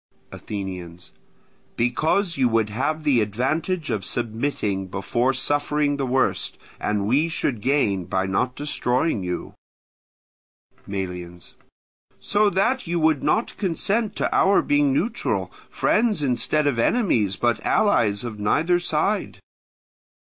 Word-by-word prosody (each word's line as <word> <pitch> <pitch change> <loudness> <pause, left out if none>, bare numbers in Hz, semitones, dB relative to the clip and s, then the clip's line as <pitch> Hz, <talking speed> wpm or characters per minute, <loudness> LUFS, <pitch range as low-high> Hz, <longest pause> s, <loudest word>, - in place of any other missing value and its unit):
Athenians. 90 -4 -7 0.6
Because 160 - +1
you 130 -3 +2
would 110 -2 +1
have 155 +8 -2
the 130 -6 +3
advantage 155 - -1
of 100 - -2
submitting 110 -4 -2
before 100 +7 0
suffering 145 +2 0
the 135 -2 -2
worst, 130 +1 0 0.2
and 105 -1 -1
we 145 +8 +2
should 125 -8 -2
gain 105 -9 +1
by 95 +1 -1
not 125 +7 -1
destroying 135 -3 0
you. 90 0 -4 1.3
Melians. 90 -3 -6 0.7
So 210 0 +2
that 230 +6 0
you 170 0 0
would 155 -3 +2
not 225 - 0
consent 205 +4 -1
to - - -1
our 195 +1 +4
being 145 -1 +2
neutral, 185 - -1 0.2
friends 215 -7 +1
instead 145 +3 +1
of 140 -5 +1
enemies, 115 - +2
but 120 -2 0
allies 110 - +2
of 115 -3 -6
neither 165 +12 +2
side. 175 +5 -1
130 Hz, 120 wpm, -23 LUFS, 105-160 Hz, 1.3 s, our